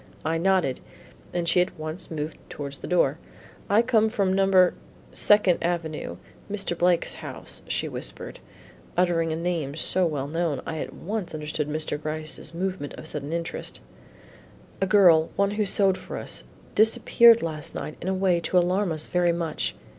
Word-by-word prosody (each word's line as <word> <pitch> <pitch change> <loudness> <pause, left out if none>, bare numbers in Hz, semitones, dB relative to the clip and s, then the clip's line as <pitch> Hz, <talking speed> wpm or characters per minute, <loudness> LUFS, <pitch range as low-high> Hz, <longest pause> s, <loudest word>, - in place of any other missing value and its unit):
I 165 +1 0
nodded, 185 -7 +2 0.5
and 175 -1 -2
she 180 +1 +5
at 180 - -2
once 155 +2 -4
moved 155 -1 -5
towards 140 -1 -6
the - - -7
door. 165 -4 +2 0.5
"I 215 +3 +5
come 220 -2 +3
from 200 -4 +1
No. 190 -2 +5 0.4
Second 205 -4 +4
Avenue: 160 - -2 0.3
Mr. 195 -4 -1
Blake's 175 0 +2
house," - - -5
she - - -1
whispered, - - -3 0.6
uttering 170 -2 +2
a - - -1
name 165 -4 -2
so 180 +3 +1
well 145 -4 -2
known, 165 -1 -1
I 160 - -4
at - - -4
once 200 -2 -4
understood 150 0 -3
Mr. 155 -1 -3
Gryce's 155 0 -4
movement 180 -3 -3
of - - -9
sudden 150 -1 -4
interest 170 0 -4 1.0
"A 195 - +2
girl 175 -5 +6
one 200 0 +2
who 210 0 0
sewed 190 -1 +2
for 180 +1 -7
us - - -5 0.3
disappeared 230 +1 +6
last 155 -2 -4
night 155 - -5
in 175 - -5
a 190 - +1
way 185 -2 +2
to 170 +2 0
alarm 180 +2 +2
us 155 -1 -2
very 175 -1 +2
much. 160 - -2
170 Hz, 165 wpm, -25 LUFS, 155-190 Hz, 1.0 s, girl